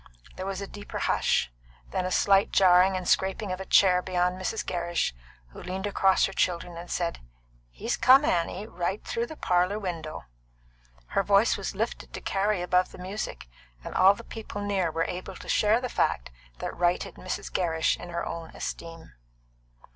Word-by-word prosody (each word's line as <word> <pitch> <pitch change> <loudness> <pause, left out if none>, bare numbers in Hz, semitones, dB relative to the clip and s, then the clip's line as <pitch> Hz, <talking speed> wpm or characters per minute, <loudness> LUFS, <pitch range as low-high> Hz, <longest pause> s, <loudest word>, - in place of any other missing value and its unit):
There 185 - -5
was 195 0 -3
a 200 - -5
deeper 205 +1 -8
hush; - - +1 0.4
then 180 - -1
a - - -4
slight 195 +1 +4
jarring 185 0 +5
and 185 - -5
scraping 190 +1 +1
of 185 - -3
a 190 - -7
chair 180 -2 +5
beyond 180 0 0
Mrs. 210 +3 -2
Gerrish, 175 - -1 0.4
who - - -11
leaned 190 +2 -4
across 195 -2 +3
her - - -4
children 175 -1 -1
and 170 +1 -8
said, 170 -1 -2 0.5
"He's - - -3
come, 270 +3 +6
Annie 180 +1 0
right 185 -1 -3
through 235 +1 -2
the 315 - -8
parlour 180 -3 +1
window!" 170 -6 -5 0.9
Her - - +2
voice 200 +3 +4
was 200 0 -4
lifted 225 +4 -3
to - - -4
carry 195 -1 0
above 180 +1 +2
the - - -11
music, 190 - -5 0.4
and - - -7
all 190 +2 +6
the 235 - -11
people 220 -2 -7
near 195 -4 0
were 165 +1 -1
able 185 +1 -6
to - - -11
share 215 +2 +3
the 250 - -3
fact - - 0 0.3
that - - -5
righted 175 0 0
Mrs. 185 - -6
Gerrish 165 -3 +1
in 175 - -10
her 170 0 -3
own 165 -1 -6
esteem. 165 -1 -7
185 Hz, 180 wpm, -27 LUFS, 175-200 Hz, 0.9 s, come